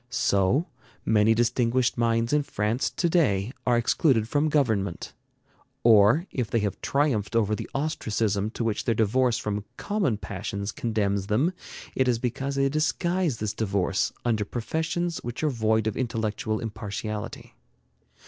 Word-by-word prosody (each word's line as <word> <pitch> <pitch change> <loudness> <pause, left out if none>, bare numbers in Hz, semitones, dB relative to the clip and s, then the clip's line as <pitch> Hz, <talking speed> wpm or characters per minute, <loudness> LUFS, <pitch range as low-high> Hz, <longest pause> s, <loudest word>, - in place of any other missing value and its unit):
So, 100 - +2 0.4
many 110 +1 +4
distinguished 120 +1 +1
minds 115 +1 +1
in 150 - +4
France 115 -2 -1
to 175 - -1
day 120 - +2 0.2
are 120 -1 +4
excluded 120 -1 +2
from 145 +5 +1
government; 110 - 0 0.7
or 115 - +6
if 125 -4 -2
they - - +1
have 100 -2 -3
triumphed 135 -7 0
over 110 -2 +2
the - - -4
ostracism 110 -8 -1
to 115 - -4
which 110 -2 -1
their 115 - +1
divorce 120 +3 +2
from 105 -1 -3
common 200 - 0
passions 100 0 -4
condemns 100 -4 -1
them, 130 - +1 0.4
it 130 - +2
is 120 -2 +2
because 130 +3 -3
they 135 0 +2
disguise 160 +1 0
this 105 -1 -2
divorce 95 -3 0
under 110 -3 +1
professions 160 +10 -2
which 120 +5 -6
are 155 - +2
void 110 -2 +1
of 110 - -1
intellectual 110 -3 -2
impartiality. 105 -1 -5
115 Hz, 145 wpm, -26 LUFS, 105-135 Hz, 0.7 s, or